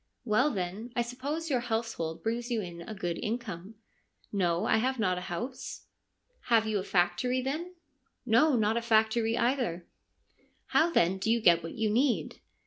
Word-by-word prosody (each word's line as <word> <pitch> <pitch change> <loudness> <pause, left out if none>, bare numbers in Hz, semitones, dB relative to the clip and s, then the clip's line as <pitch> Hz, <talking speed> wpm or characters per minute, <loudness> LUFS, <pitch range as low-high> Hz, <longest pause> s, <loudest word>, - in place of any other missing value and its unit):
' - - -47
Well, 255 +7 +4
then, 200 +2 -4
I 240 - +2
suppose 285 +7 -4
your 255 - +3
household 225 -9 -3
brings 235 +2 -2
you 235 -2 0
in 175 -4 -6
a 215 +6 -7
good 175 -4 -3
income.' 215 -4 -4 0.3
' - - -37
No, 170 0 +1
I - - +3
have 260 +4 0
not 185 -5 +1
a 185 - -8
house.' 240 +9 -5 0.6
1 230 - +6
Have 220 - +1
you 215 -2 0
a - - -3
factory, 180 +8 +1
then? 310 +8 -3 0.2
' 275 -1 -45
' - - -50
No, 300 +2 +5
not 220 0 +2
a - - 0
factory 225 0 +2
either.' 235 -9 0 0.4
' - - -38
How 325 +2 +5
then 190 - +2
do 195 - -1
you 235 +1 +3
get 170 -6 +5
what 165 - -7
you 220 -3 0
need 250 +3 +1
225 Hz, 200 wpm, -30 LUFS, 185-250 Hz, 0.6 s, 1